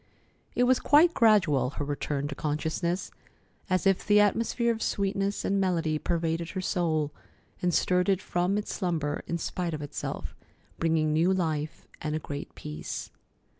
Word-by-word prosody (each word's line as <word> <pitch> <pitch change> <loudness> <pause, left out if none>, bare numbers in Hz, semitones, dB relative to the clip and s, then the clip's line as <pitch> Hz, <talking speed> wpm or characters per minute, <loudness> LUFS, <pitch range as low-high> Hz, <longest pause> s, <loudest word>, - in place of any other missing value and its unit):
It 245 - +3
was 255 +1 +4
quite 320 +4 +5
gradual, 185 - +4
her 145 - -2
return 145 0 -2
to - - -3
consciousness, 160 +5 -2 0.6
as 185 0 +1
if 195 -1 +3
the 210 0 +5
atmosphere 230 +3 +2
of 225 - -7
sweetness 200 0 -1
and 195 0 +1
melody 165 -5 +1
pervaded 165 0 -1
her 190 - -4
soul, 160 -5 0 0.5
and 180 - +2
stirred 180 +2 +2
it 190 -2 +3
from 180 +2 0
its 210 - -3
slumber 165 -6 -1
in 170 - -1
spite 170 -1 -3
of 150 - -6
itself, 145 - -5 0.4
bringing 160 -2 +2
new 165 +4 +3
life 160 -5 -1 0.2
and 155 0 -2
a - - -1
great 145 -2 -7
peace. 75 0 -6
175 Hz, 160 wpm, -28 LUFS, 155-195 Hz, 0.6 s, quite